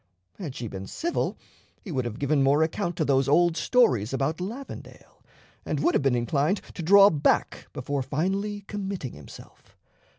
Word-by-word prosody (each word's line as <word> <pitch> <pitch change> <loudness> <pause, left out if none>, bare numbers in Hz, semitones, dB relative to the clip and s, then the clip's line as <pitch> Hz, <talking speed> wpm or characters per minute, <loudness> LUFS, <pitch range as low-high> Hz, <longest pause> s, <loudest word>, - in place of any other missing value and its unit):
Had 155 -9 -6
she 120 - -5
been 95 -1 -7
civil 340 +1 -2 0.5
he 195 - -7
would 130 -5 -1
have 115 -2 -5
given 140 0 +1
more 140 +3 +4
account 175 +2 -2
to 160 - 0
those 135 -1 +2
old 170 +3 +4
stories 130 - +2
about 140 +6 -1
Lavendale, 235 +9 -9 0.4
and - - -2
would 345 - +2
have - - +2
been 135 -2 +2
inclined 140 - +1
to - - -6
draw 200 +4 +7
back 150 -3 0
before 140 -1 -3
finally 195 +10 -2
committing 195 - -5
himself. 75 -1 -14
155 Hz, 165 wpm, -26 LUFS, 135-195 Hz, 0.5 s, draw